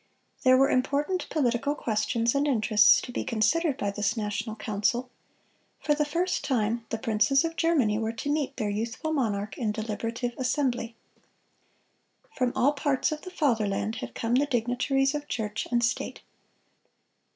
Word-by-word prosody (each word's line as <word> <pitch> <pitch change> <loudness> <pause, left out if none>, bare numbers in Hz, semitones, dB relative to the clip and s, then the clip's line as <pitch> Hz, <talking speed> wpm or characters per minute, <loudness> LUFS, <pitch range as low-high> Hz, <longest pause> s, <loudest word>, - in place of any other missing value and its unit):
There 255 0 +5
were 270 +1 +4
important 290 +8 0
political 275 0 0
questions 230 -1 0
and 280 +1 +1
interests 215 -5 +5
to 245 - -7
be - - -3
considered 260 +7 +1
by 205 - -1
this 210 +3 -1
national 215 +1 -3
council; 220 +3 -1 0.7
for 295 - +1
the 300 0 +1
first 345 +5 -1
time 230 -3 0
the 225 - -2
princes 225 +7 +2
of 330 0 -3
Germany 275 -12 +2
were 225 0 -1
to 255 +6 -3
meet 295 -2 -1
their 210 -4 -1
youthful 230 +9 -3
monarch 205 -7 -2
in 220 -3 0
deliberative 230 +2 -3
assembly. 250 -3 -1 1.4
From 255 - 0
all 285 +3 +3
parts 285 0 0
of 305 0 -4
the 370 - -8
fatherland 225 - 0
had 120 -1 -7
come 230 +1 -1
the 280 +4 +3
dignitaries 270 +2 +1
of 295 0 -4
church 215 -2 -3
and 240 -1 +1
state. 250 - -3
240 Hz, 155 wpm, -27 LUFS, 220-285 Hz, 1.4 s, There